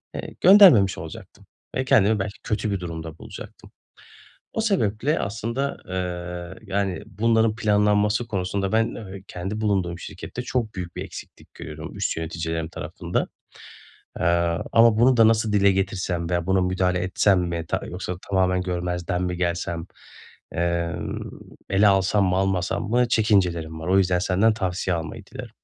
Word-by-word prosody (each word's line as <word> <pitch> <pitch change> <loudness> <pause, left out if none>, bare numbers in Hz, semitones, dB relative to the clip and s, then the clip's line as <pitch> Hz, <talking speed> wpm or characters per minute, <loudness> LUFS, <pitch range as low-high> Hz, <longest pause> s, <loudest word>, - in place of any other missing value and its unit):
eee, - - -6
göndermemiş 175 - +7
olacaktım 80 0 -10 0.3
ve 130 - 0
kendimi 110 -5 +4
belki 100 +1 -4
kötü 105 -1 -1
bir 100 - -1
durumda 80 -2 -6
bulacaktım. - - -11 0.8
O 220 - -1
sebeple, 150 - +1
aslında, 115 +7 -3
eee, 90 +2 -5
yani, 95 -3 -1
bunların 110 +1 +1
planlanması 105 0 +2
konusunda 95 -1 -2
ben, 115 +1 +1
eee, 95 -3 -9
kendi 95 +5 -5
bulunduğum 95 -5 0
şirkette 125 - -7
çok 120 -4 -2
büyük 90 -2 -6
bir - - -4
eksiklik - - -11
görüyorum 75 +1 -8
üst - - -1
yöneticilerim 80 0 -3
tarafında. 85 +2 -3 0.9
Eee, - - 0 0.5
ama 115 -1 +5
bunu 125 +1 +5
da 115 -1 +7
nasıl 110 -1 +1
dile 100 -1 +4
getirsem 95 -3 -2
veya 85 0 0
buna 95 0 +3
müdahale 90 0 +1
etsem 95 +1 +2
mi 85 -2 -2
ta - - -1
yoksa 90 0 -5
tamamen 90 -2 +2
görmezden 90 0 -2
mi 90 0 -2
gelsem, 85 -1 -2 0.7
emm, 85 -1 -2 0.5
ele 100 +2 +5
alsam 100 +1 +3
mı, 90 - +1
almasam 95 +1 0
mı 120 0 +3
çekincelerim 90 -8 +1
var. 80 - -5
O 95 +1 +4
yüzden 90 -2 +2
senden 100 +4 +2
tavsiye 95 -2 -1
almayı 80 -1 -7
dilerim. - - -9
95 Hz, 145 wpm, -24 LUFS, 90-105 Hz, 0.9 s, göndermemiş